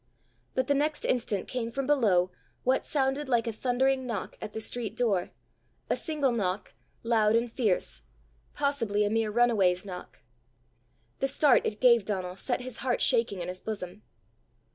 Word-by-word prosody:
But 260 - +1
the 285 - +2
next 295 +2 0
instant 225 -5 0
came 245 -3 -3
from 270 +3 -3
below 205 -11 +3 0.3
what 260 +1 +2
sounded 270 0 0
like 240 -2 +2
a 230 - -2
thundering 260 +3 +1
knock 220 -6 -4
at 215 - -5
the 220 - -5
street 225 -1 -3
door 200 -7 +1 0.6
a - - +4
single 300 -5 0
knock, 195 -4 -2 0.3
loud 225 -2 +3
and 235 0 +1
fierce 210 - 0 0.5
possibly 230 -8 +1
a 205 - 0
mere 225 -1 +1
runaway's 205 -6 +3
knock. 180 -2 -9 1.0
The 270 - +1
start 275 -1 +4
it 210 - -4
gave 235 -5 +5
Donal 185 -3 -3
set 245 +6 -2
his 250 -2 -7
heart 250 -1 0
shaking 230 -7 +2
in 170 - -4
his 180 0 -6
bosom. 200 -2 -6
230 Hz, 165 wpm, -29 LUFS, 205-260 Hz, 1.0 s, gave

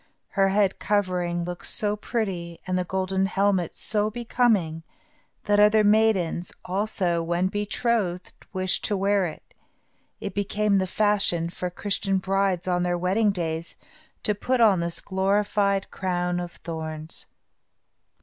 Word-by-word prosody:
Her 195 0 +2
head 195 -1 +2
covering 180 -4 0
looked 175 0 -5
so 210 -1 0
pretty, 190 -7 -3
and 185 - -1
the 180 - +1
golden 190 +1 0
helmet 195 -3 +1
was - - -19
so 210 -1 0
becoming, 220 -8 +1 0.6
that 205 0 +2
other 210 +1 +6
maidens, 205 -5 +2
also, 185 -3 0
when 175 +2 0
betrothed, 205 -2 -1 0.2
wished 185 -1 -1
to 205 - 0
wear 195 -1 +2
it. 155 - -11 0.7
It 200 - -5
became 205 0 +1
the 190 - 0
fashion 195 -4 +1
for 180 +1 -4
Christian 195 +1 -1
brides, 190 -1 0
on 180 -1 +1
their 175 0 0
wedding 190 +5 +2
days, 165 -3 -3 0.5
to 210 - +2
put 250 +5 -1
on 210 -6 +5
this 170 0 -3
glorified 200 0 +1
crown 180 -1 -1
of 175 -1 -5
thorns. 160 -1 -7
190 Hz, 140 wpm, -25 LUFS, 175-205 Hz, 0.7 s, other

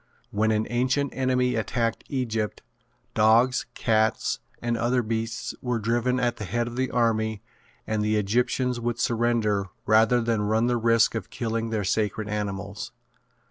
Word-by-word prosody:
When 110 +2 +1
an 110 0 +1
ancient 130 +3 +1
enemy 130 -1 +1
attacked 115 +1 -1
Egypt, 115 -5 -2 0.5
dogs, 115 +4 +4
cats, 110 -1 +1 0.2
and 120 0 -1
other 120 +2 +1
beasts 115 +1 -3
were 125 -2 -1
driven 120 +3 0
at 120 -1 0
the 105 - -5
head 120 +4 -1
of 120 - -6
the 130 +1 0
army 110 -3 0 0.4
and 110 -1 -1
the 105 +1 +1
Egyptians 120 +4 +1
would 120 0 -2
surrender 115 -4 +1 0.2
rather 110 +3 +4
than 115 -2 0
run 110 +2 +2
the 120 0 +1
risk 115 0 +3
of 110 -5 -4
killing 115 -1 -2
their 110 -2 -1
sacred 105 +2 -1
animals. 100 -1 -4
115 Hz, 150 wpm, -26 LUFS, 110-120 Hz, 0.5 s, dogs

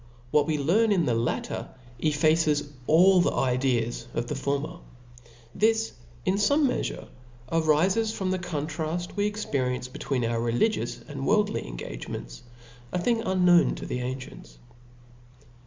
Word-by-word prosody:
What 150 -1 +3
we 155 -1 +1
learn 200 +11 +3
in 180 -5 +3
the 120 - +1
latter, 115 +1 -2 0.3
effaces 150 0 +2 0.2
4II 180 +4 +6
the - - +1
ideas 125 -2 0
of 120 - -1
the 135 - -4
former. 140 +4 -2 0.7
This 215 - +2 0.3
in 190 - +2
fome 285 +9 +3
meafurc 255 - -2 0.4
arifcs 165 +7 +2
from 190 -3 -2
the 185 - 0
contrail 160 +1 -3
we 205 0 +1
experience 130 -12 -2
be 125 - -10
tween 130 -4 -1
our 115 0 0
religious 120 - 0
and 140 -2 -5
worldly 210 - +1
engagements - - -7 0.3
\ 120 +1 -22
a. - - -1
thing 225 +6 +1
unknown 180 -3 +4
to - - -7
the 125 - -3
ancients. 130 +1 -7
155 Hz, 140 wpm, -27 LUFS, 125-185 Hz, 0.7 s, 4II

